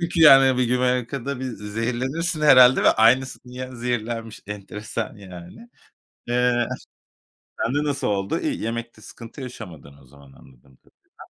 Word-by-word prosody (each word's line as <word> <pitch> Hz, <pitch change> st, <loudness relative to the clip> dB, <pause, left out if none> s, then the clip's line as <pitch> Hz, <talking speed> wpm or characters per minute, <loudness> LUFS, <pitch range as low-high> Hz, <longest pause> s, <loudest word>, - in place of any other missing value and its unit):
Yani 135 Hz, -5 st, +6 dB
Güney 125 Hz, -, +1 dB
Amerika'da 125 Hz, +2 st, -2 dB
bir 130 Hz, -, -4 dB
zehirlenirsin 125 Hz, +8 st, -3 dB
herhâlde 130 Hz, -4 st, +6 dB
ve -, -, +6 dB
aynısının 125 Hz, +2 st, +1 dB
yan 130 Hz, 0 st, -7 dB
zehirlenmiş, 115 Hz, -2 st, -4 dB
enteresan 105 Hz, +2 st, -6 dB
yani. 95 Hz, -, -12 dB, 0.6 s
Iıı, 120 Hz, 0 st, +1 dB, 0.9 s
sende 145 Hz, +5 st, 0 dB
nasıl 140 Hz, -1 st, -2 dB
oldu? 100 Hz, -1 st, -1 dB
İyi, -, -, -3 dB
yemekte 115 Hz, 0 st, -5 dB
sıkıntı 115 Hz, +5 st, -12 dB
yaşamadın 90 Hz, -, -10 dB
o -, -, -20 dB
zaman, 70 Hz, +1 st, -18 dB
anladığım 65 Hz, 0 st, -21 dB
kadarıyla. -, -, -34 dB
120 Hz, 125 wpm, -22 LUFS, 105-130 Hz, 0.9 s, Yani